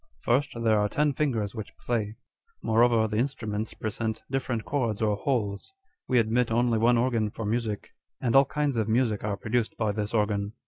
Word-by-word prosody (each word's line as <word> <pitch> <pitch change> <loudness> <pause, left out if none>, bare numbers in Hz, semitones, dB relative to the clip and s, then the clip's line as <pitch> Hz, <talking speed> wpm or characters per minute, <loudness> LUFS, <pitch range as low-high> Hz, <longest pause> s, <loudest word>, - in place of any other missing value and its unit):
First, 135 +4 +1
there 110 -2 +4
arc 105 0 0
ten 150 -1 +2
fingers 120 -9 -1
which 110 -3 -8
play: 110 -3 -2 0.5
moreover, 115 0 +4
the 105 0 -2
instruments 110 -5 -2
present 110 0 -3
different 125 -4 -2
chords 120 -7 -1
or 105 -2 +1
holes. 105 - -2 0.3
We 125 - +2
admit 115 +1 +2
only 115 0 +2
one 120 +2 +4
organ 115 -3 +1
for 110 +1 -6
music; 110 -1 -2 0.3
and 120 -1 0
all 135 +1 +7
kinds 145 -2 -1
of 110 -1 0
music 110 -2 +1
are 105 -1 -2
produced 115 +1 -1
by 110 -2 +1
this 105 +1 -3
organ. 105 -2 0
115 Hz, 180 wpm, -27 LUFS, 105-125 Hz, 0.5 s, all